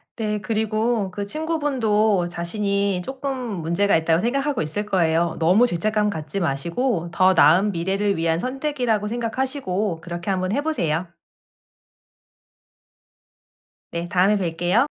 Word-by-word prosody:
네 210 -2 -2
그리고 220 -1 0
그 200 +2 -5
친구분도 225 - +1
자신이 200 +2 -1
쪼끔 270 +4 -4 0.3
문제가 170 +5 +2
있다고 160 +1 +2
생각하고 275 +4 0
있을 185 +8 -3
거예요. 170 -4 +1
너무 180 +9 +5
죄책감 210 +1 0
갖지 155 +3 -4
마시고 170 - -1
더 185 +2 +4
나은 175 +7 +5
미래를 195 +4 0
위한 165 -1 +1
선택이라고 255 - -1
생각하시고 225 - -2
그렇게 175 +2 -6
한번 185 -1 0
해 280 +7 0
보세요. 175 - -1 2.8
네 170 +1 -3
다음에 195 +3 +3
뵐게요. 180 +7 +1
200 Hz, 290 characters per minute, -22 LUFS, 170-230 Hz, 2.8 s, 너무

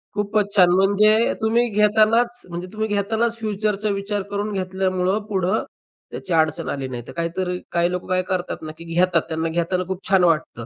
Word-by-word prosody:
खूपच 205 0 0
छान 180 -3 +6
म्हणजे 200 +2 +4 0.3
तुम्ही 230 +2 +2
घेतानाच 220 +3 +3
म्हणजे 175 +2 -6
तुम्ही 220 0 -2
घेतानाच 220 +3 0
फ्युचरचा 210 -1 -1
विचार 200 +1 -2
करून 205 +1 -2
घेतल्यामुळं 185 +1 -1
पुढं 190 +1 0 0.5
त्याची 190 - -5
अडचण 160 -1 +1
आली 135 -2 -3
नाही. 125 -2 -6
तर - - -8
काहीतरी 180 +2 -2
काही 175 0 +1
लोकं 180 0 -4
काय 185 0 +1
करतात 185 -1 -2
ना, 155 -1 -6
की 165 - -10
घेतात 170 0 +2
त्यांना 160 0 -2
घेताना 175 +2 -1
खूप 190 -1 -4
छान 190 -2 +4
वाटतं. 155 -8 0
190 Hz, 175 wpm, -22 LUFS, 175-210 Hz, 0.5 s, छान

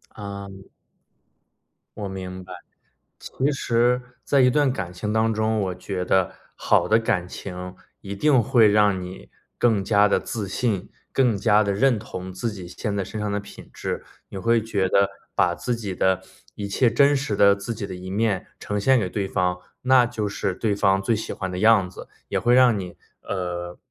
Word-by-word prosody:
嗯。 100 -2 -8 1.3
我 105 -2 -4
明 95 -1 -7
白。 90 - -10 0.7
其 135 +3 -1
实 125 -2 +1 0.2
在 140 - +2
一 125 - +6
段 145 0 +2
感 90 -5 -4
情 105 +4 -3
当 110 0 +2
中， 110 0 0
我 95 -2 -2
觉 90 -2 -4
得 95 -1 +2 0.2
好 - - +2
的 110 - +5
感 105 -6 -1
情 90 0 -7 0.3
一 100 0 -6
定 135 +4 +4
会 110 0 +5
让 105 -2 +3
你 90 +1 -9 0.3
更 110 -5 +2
加 105 0 +4
地 - - +2
自 110 -5 -4
信、 100 -1 -2 0.2
更 125 -5 +3
加 105 0 +4
地 100 -1 0
认 125 +1 +2
同 95 -3 -7
自 110 +5 -3
己 95 -4 -8
现 100 +3 -4
在 100 - -1
身 110 +3 -7
上 105 -1 -2
的 105 - -1
品 100 0 -12
质。 - - -4 0.3
你 95 - -7
会 115 +3 +2
觉 100 -4 0
得 100 +1 +3 0.3
把 - - +3
自 125 - -2
己 105 -5 -5
的 95 -1 +2 0.3
一 100 -1 -4
切 120 +4 +2
真 140 +4 +4
实 135 -6 -1
的 100 0 +5
自 100 +4 -5
己 105 -2 -4
的 95 - -7
一 90 +1 -8
面， 100 -1 0
呈 105 0 -3
现 130 +4 +4
给 95 -3 -2
对 100 -1 -2
方， 90 -2 0 0.2
那 130 -1 +5
就 110 -3 -3
是 100 -1 -2
对 105 -1 0
方 95 -1 +2
最 105 +4 +1
喜 110 - -4
欢 95 -2 -4
的 90 - -4
样 110 -4 +5
子， 95 - -11 0.2
也 - - 0
会 120 +1 +3
让 125 -4 +5
你， 90 -2 -8 0.2
呃， 90 -2 -4
100 Hz, 210 characters per minute, -24 LUFS, 95-115 Hz, 1.3 s, 一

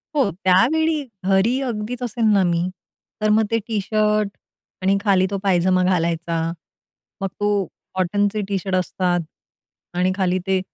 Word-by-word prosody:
हो 270 -8 +3
त्यावेळी 295 - +3 0.2
घरी 195 +7 +3
अगदीच 230 +2 -4
असेल 235 0 -2
ना 195 - +4
मी. 170 0 +1 0.6
तर 215 - +2
मग 220 +1 +4
ते 230 - +3
टी-शर्ट 215 0 +1 0.5
आणि 195 +1 +3
खाली 190 -3 +3
तो 200 - -1
पायजमा 185 -1 +3
घालायचा. 170 -2 0 0.8
मग 195 - 0
तो 205 - +1 0.5
कॉटनचे 205 +3 +1
टी-शर्ट 195 -1 -1
असतात 180 -1 0 0.8
आणि 185 +1 +2
खाली 185 -1 +1
ते 190 -1 +2
195 Hz, 135 wpm, -21 LUFS, 185-215 Hz, 0.8 s, ना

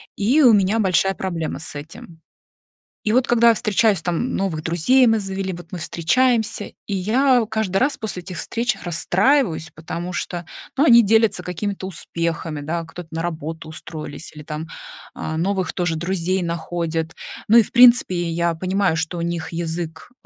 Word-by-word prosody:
и 245 +10 +3
у 245 -5 +7
меня 205 +2 +3
большая 195 -1 +2
проблема 170 -4 -3
с 160 -1 -7
этим. 160 +3 -10 0.8
И 215 - 0
вот 255 +1 +3
когда 235 -1 +5
я - - +6
встречаюсь 215 -3 +2
там 175 +9 -2
новых 170 -6 -2
друзей 175 +11 +3
мы 225 -1 +3
завели, 195 -1 -3
вот 175 -1 -11
мы 180 - -5
встречаемся, 220 +7 +1 0.2
и 205 - -3
я 245 +6 +3
каждый 220 -4 -1
раз 275 +7 +1
после 215 -5 -4
этих 180 -1 -7
встреч 235 +4 -1
расстраиваюсь, 175 - +1
потому 170 +3 -6
что, 175 0 -4 0.3
ну, 285 - +4
они 235 -4 +7
делятся 220 -2 +3
какими-то 190 +2 -4
успехами, 165 -3 -3
да, 165 +3 -3
кто-то 160 +1 -10
на 165 0 -3
работу 160 -1 -5
устроились, 155 0 -8
или 150 - -9
там, 155 +1 -6 0.5
а, 160 0 -4
новых 190 +2 -1
тоже 175 -3 -1
друзей 185 +2 -1
находят. 165 -1 -3 0.3
Ну, 225 - +7
и, 230 - +8
в - - -10
принципе, 235 -8 +5
я 170 +1 0
понимаю, 185 +1 0
что 165 +2 -2
у - - -2
них 170 -1 -3
язык 165 +1 -5
180 Hz, 170 wpm, -21 LUFS, 165-215 Hz, 0.8 s, и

